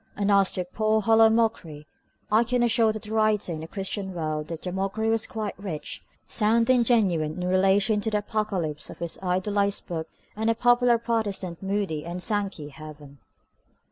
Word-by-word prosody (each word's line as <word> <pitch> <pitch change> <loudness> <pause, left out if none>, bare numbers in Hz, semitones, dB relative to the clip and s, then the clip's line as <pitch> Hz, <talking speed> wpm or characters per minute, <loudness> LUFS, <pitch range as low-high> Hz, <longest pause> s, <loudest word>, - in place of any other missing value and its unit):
And 205 0 0
as 195 -1 +4
to 185 - -2
the 180 - -21
"poor 215 0 +2
hollow 225 +1 +5
mockery," 215 -10 -1 0.5
I 220 +2 +5
can 245 +1 0
assure 230 -1 +3
the 215 0 -7
writer 215 -4 +1
in 160 - -4
the 160 - -7
Christian 195 0 -4
World 155 -2 -3
that 165 -1 -7
the 180 - -3
mockery 195 +4 -1
was 225 0 +1
quite 215 -2 -4
rich, 165 -7 -5 0.2
sound 230 +2 +3
and 250 -2 +4
genuine 180 -10 +1
in 180 - -2
relation 195 +3 +3
to 220 - -1
the 210 - 0
Apocalypse 195 -7 -2
of - - -10
his 170 -1 -4
idolised 200 +2 0
book 165 -3 -4 0.3
and 220 +2 0
the 230 - +2
popular 245 0 +4
Protestant 210 -7 -3
Moody 195 -6 -2
and 175 +2 -5
Sankey 195 -7 -2
heaven. 150 -2 -12
200 Hz, 180 wpm, -25 LUFS, 175-220 Hz, 0.5 s, hollow